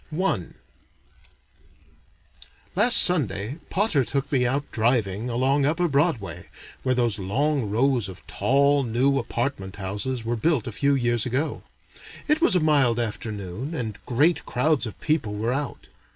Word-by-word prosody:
I 185 - 0 2.3
Last 225 +5 +6
Sunday, 130 - +4
Potter 190 -8 +1
took 140 +3 -3
me 125 -3 +2
out 140 +3 -2
driving 110 -1 0
along 130 +4 +1
upper 175 +3 +1
Broadway, 140 - -1 0.3
where 130 -1 0
those 120 -4 +1
long 130 +5 -1
rows 120 -1 +1
of 95 +1 -11
tall 140 +2 +2
new 130 +4 +1
apartment 115 -5 -3
houses 105 +5 -4
were 120 +1 -1
built 140 0 0
a - - -5
few 140 +6 +1
years 120 -2 +1
ago. 135 +6 -2 0.7
It 305 +1 +2
was 340 - +4
a - - +4
mild 140 -7 +3
afternoon 110 - -5
and 110 -8 -5
great 145 +8 +2
crowds 130 0 +1
of 110 - -10
people 145 -10 -1
were 115 +4 -1
out. 140 -2 -5
125 Hz, 140 wpm, -24 LUFS, 110-145 Hz, 2.3 s, Last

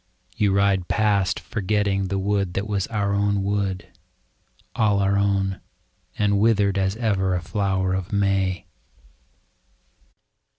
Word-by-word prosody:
You 105 -2 +2
ride 100 -2 +2
past 100 -3 +1
forgetting 100 -2 -1
the 100 +1 -2
wood 100 -2 -1
that 100 - -1
was 100 -3 -2
our 100 -2 -1
own 100 -1 +1
wood. 100 -2 -2 0.9
All 105 -3 +2
our 100 0 +1
own 100 -1 0 0.3
— - - -36
and 100 -1 +2
withered 105 -3 +2
as 95 +1 0
ever 100 -5 0
a 90 - -2
flower 95 0 -1
of 95 0 -3
May. 95 -2 0
100 Hz, 130 wpm, -23 LUFS, 95-100 Hz, 0.9 s, You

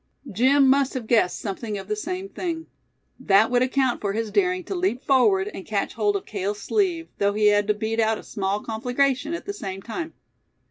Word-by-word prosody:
Jim 265 +7 +4
must 270 0 +3
have 250 -3 -3
guessed 215 -6 +2
something 210 +1 -4
of 195 -1 -8
the 210 - -1
same 365 - -4
thing. 335 -4 -4 0.5
That 205 +3 +4
would 245 0 +3
account 260 -1 +1
for 200 -1 -1
his 220 0 -2
daring 365 -2 +1
to 390 - -5
leap 350 -9 -1
forward, 215 -8 +3
and 190 - -7
catch 205 -1 -2
hold 210 -2 +1
of 200 - -3
Cale's 205 0 -3
sleeve, 345 - 0
though 200 0 +2
he 210 0 +4
had 205 0 +2
to 210 - +2
beat 220 +2 -2
out 220 0 +2
a - - -10
small 200 +1 -2
conflagration 255 +6 0
at - - -8
the 405 - -4
same 195 - -6
time. 320 +8 -5
225 Hz, 205 wpm, -24 LUFS, 205-280 Hz, 0.5 s, Jim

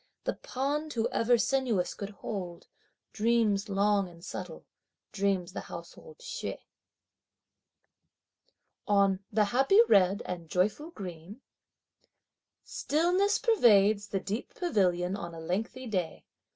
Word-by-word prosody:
The - - -1
pond 295 +4 -3
who 230 -1 0
ever 240 +1 +3
sinuous 235 -6 0
could 200 - -6
hold? 190 -4 -6 0.5
Dreams 220 -2 +1
long 200 -1 +2
and 170 0 -14
subtle, 180 -3 -7 0.5
dream 195 -2 0
the - - -7
household 475 -1 -10
Hsieh. - - -5 2.3
On 200 -2 +3
"the 210 0 +3
happy 270 - +4
red 195 +1 +4
and 170 -3 -6
joyful 210 - 0
green:" 190 - -9 1.2
Stillness 360 +7 +1
pervades 215 - +4
the 195 - -2
deep 205 +5 -5
pavilion 185 - +1
on 170 -4 -6
a - - -8
lengthy 215 +10 -3
day. 185 -8 -3
205 Hz, 110 wpm, -29 LUFS, 185-250 Hz, 2.3 s, happy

